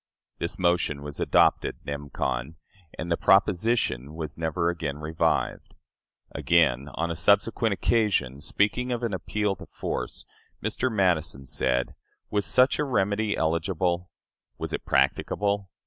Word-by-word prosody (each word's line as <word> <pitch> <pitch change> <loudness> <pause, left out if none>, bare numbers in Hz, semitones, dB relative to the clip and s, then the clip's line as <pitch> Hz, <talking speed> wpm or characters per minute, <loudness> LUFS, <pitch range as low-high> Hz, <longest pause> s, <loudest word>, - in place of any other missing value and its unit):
This 85 - -2
motion 85 -5 +1
was 75 0 -7
adopted - - +3
nem. 70 0 -5
con., 65 +4 -2 0.4
and 85 +2 -4
the 85 - +2
proposition 95 - +2
was 80 -3 -5
never 85 +1 0
again 80 -5 -3
revived. 75 +1 -1 0.6
Again, 70 -6 +2
on 85 +1 -1
a - - -3
subsequent 100 +6 +3
occasion, 95 - +1
speaking 105 - 0
of 120 0 -2
an 115 -4 -1
appeal 100 +2 -1
to - - -11
force, - - -4 0.3
Mr. 130 - -1
Madison 85 -9 +1
said: 60 -1 0 0.4
"Was 105 -1 0
such 130 +3 +4
a - - +2
remedy 105 -5 0
eligible? 85 +2 0 0.5
Was - - -5
it - - -4
practicable?... 100 +9 +1
85 Hz, 130 wpm, -26 LUFS, 75-100 Hz, 0.6 s, such